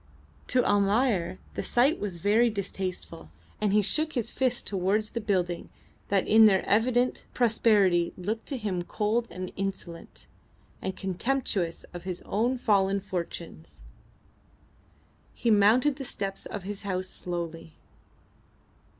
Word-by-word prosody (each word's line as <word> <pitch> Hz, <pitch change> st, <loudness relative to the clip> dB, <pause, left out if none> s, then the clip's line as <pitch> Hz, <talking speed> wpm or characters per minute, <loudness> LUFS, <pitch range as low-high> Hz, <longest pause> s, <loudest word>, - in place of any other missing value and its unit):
To 250 Hz, -2 st, +2 dB
Almayer 200 Hz, -2 st, +2 dB, 0.2 s
the -, -, -3 dB
sight 265 Hz, +7 st, +2 dB
was 195 Hz, -4 st, -4 dB
very 215 Hz, +7 st, +3 dB
distasteful, 190 Hz, -, -5 dB, 0.3 s
and 210 Hz, -2 st, +2 dB
he 210 Hz, +1 st, +4 dB
shook 310 Hz, +9 st, 0 dB
his 235 Hz, -2 st, -1 dB
fist 255 Hz, -2 st, 0 dB
towards 205 Hz, +3 st, 0 dB
the 230 Hz, -, -3 dB
buildings 180 Hz, -5 st, -1 dB, 0.4 s
that 195 Hz, -2 st, +1 dB
in 220 Hz, +1 st, +7 dB
their 195 Hz, -3 st, +4 dB
evident 245 Hz, +4 st, +2 dB
prosperity 205 Hz, -7 st, +3 dB
looked 215 Hz, +5 st, -4 dB
to 275 Hz, -, -1 dB
him 200 Hz, -6 st, -2 dB
cold 215 Hz, +6 st, -1 dB
and 185 Hz, 0 st, -6 dB
insolent, 190 Hz, -4 st, -5 dB, 0.6 s
and 190 Hz, 0 st, -4 dB
contemptuous 190 Hz, -3 st, -1 dB
of 175 Hz, -, -6 dB
his 180 Hz, -1 st, -5 dB
own 240 Hz, +5 st, 0 dB
fallen 200 Hz, -4 st, +2 dB
fortunes. 170 Hz, -, -6 dB, 1.5 s
He 230 Hz, -, +1 dB
mounted 230 Hz, +7 st, +4 dB
the 275 Hz, -, -5 dB
steps 195 Hz, -6 st, -4 dB
of 205 Hz, -, -6 dB
his 200 Hz, +1 st, -5 dB
house 185 Hz, -2 st, -2 dB
slowly. 170 Hz, -3 st, -6 dB
200 Hz, 130 wpm, -28 LUFS, 185-230 Hz, 1.5 s, in